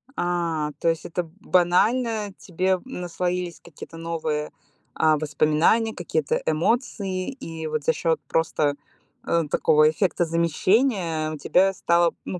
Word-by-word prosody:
А, 170 Hz, -4 st, -1 dB
то 165 Hz, -, +2 dB
есть 165 Hz, -1 st, -2 dB
это, 170 Hz, -1 st, -4 dB
банально, 210 Hz, +4 st, +2 dB
тебе 185 Hz, +1 st, -1 dB
наслоились 180 Hz, -5 st, -3 dB
какие-то 165 Hz, 0 st, -12 dB
новые, 160 Hz, -2 st, -3 dB, 0.4 s
а, 155 Hz, -1 st, +3 dB
воспоминания, 155 Hz, +9 st, +2 dB
какие-то 160 Hz, -4 st, -1 dB
эмоции, 190 Hz, -, -1 dB
и 165 Hz, -, -7 dB
вот 155 Hz, -1 st, -2 dB
за -, -, +2 dB
счёт 165 Hz, -2 st, 0 dB
просто, 155 Hz, -3 st, +1 dB, 0.5 s
э, 170 Hz, -1 st, +1 dB
такого 155 Hz, 0 st, +4 dB
эффекта 175 Hz, +1 st, 0 dB
замещения 170 Hz, -, +1 dB
тебе 190 Hz, +6 st, +3 dB
стало, 170 Hz, -1 st, +2 dB
ну, 180 Hz, -, -5 dB
170 Hz, 120 wpm, -24 LUFS, 155-185 Hz, 0.5 s, такого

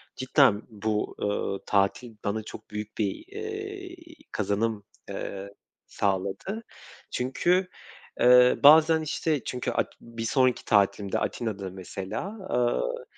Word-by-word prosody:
cidden 130 Hz, -5 st, +4 dB
bu, 105 Hz, 0 st, -2 dB
ııı, 100 Hz, -1 st, -1 dB
tatil 105 Hz, +4 st, +1 dB
bana 105 Hz, +1 st, -1 dB
çok -, -, -10 dB
büyük 105 Hz, 0 st, -6 dB
bir, 105 Hz, -, -1 dB
eee, 405 Hz, -3 st, -6 dB, 0.4 s
kazanım, 105 Hz, +1 st, -1 dB, 0.3 s
ıııı, 100 Hz, 0 st, -5 dB, 0.4 s
sağladı. 100 Hz, -, -2 dB, 0.5 s
Çünkü, 175 Hz, +9 st, +1 dB, 0.5 s
eee, 125 Hz, 0 st, +7 dB
bazen, 160 Hz, +2 st, +8 dB
işte, 155 Hz, -1 st, -1 dB
çünkü 125 Hz, -1 st, -3 dB
at -, -, -1 dB
bir 115 Hz, -1 st, -7 dB
sonraki 130 Hz, +1 st, +2 dB
tatilimde, 100 Hz, -1 st, +2 dB
Atina'da 100 Hz, -5 st, -3 dB
mesela, 95 Hz, -, -5 dB, 0.2 s
ııı, 120 Hz, -, 0 dB
115 Hz, 110 wpm, -27 LUFS, 100-150 Hz, 0.5 s, bazen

